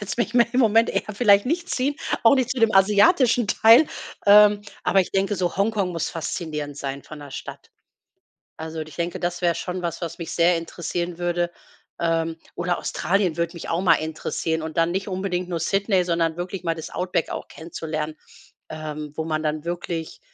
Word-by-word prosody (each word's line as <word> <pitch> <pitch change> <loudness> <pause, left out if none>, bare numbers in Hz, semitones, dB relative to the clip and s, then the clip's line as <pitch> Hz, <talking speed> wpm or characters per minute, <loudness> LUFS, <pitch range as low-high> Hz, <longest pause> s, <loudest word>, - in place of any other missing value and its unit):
jetzt 230 +3 -2 0.2
im 255 - +4
Moment 225 0 +4
eher 215 - -3
vielleicht 200 0 +4
nicht 340 +5 0
hinziehen, 275 +3 0 0.3
auch 230 +4 +7
nicht 255 -2 0
zu 255 - -2
dem 225 -2 +3
asiatischen 230 - +4
Teil. 230 +8 +6 0.4
Ähm, 205 0 +7 0.2
aber 195 - +3
ich 185 - -2
denke, 195 +1 +1
so 180 0 -1
Hongkong 200 -2 +1
muss 165 -1 -2
faszinierend 155 -3 -4
sein 140 -1 -5
von 155 - -11
der 145 -1 -10
Stadt. - - -9 0.9
Also, 160 0 -6
und 155 - -6
ich - - -13
denke, 170 0 -3
das 175 0 -2
wär 175 -2 +2
schon 180 +1 -4
was, 170 -1 -3
was 170 -1 -5
mich 170 - -6
sehr 170 0 +4
interessieren 170 +1 -4
würde. 175 0 0 0.5
Ähm, 165 -1 0 0.2
oder 175 0 -1
Australien 185 -2 0
würde 170 +1 -2
mich 170 - -8
auch 165 +2 0
mal 165 -3 +6
interessieren, 160 +1 -3
und 160 -1 -6
dann 165 0 +3
nicht 190 +3 -2
unbedingt 185 -1 -2
nur 170 -2 -3
Sydney, 195 +1 +1
sondern 165 -2 0
wirklich 180 +1 -5
mal 165 -1 0
das 160 0 -8
Outback 180 -2 -1
auch - - -5
kennenzulernen, 155 -1 -5 0.5
ähm, 155 -1 -6
wo 160 - -2
man 155 -1 -1
dann 155 -1 -2
wirklich, 170 - -4
175 Hz, 190 wpm, -23 LUFS, 160-200 Hz, 0.9 s, auch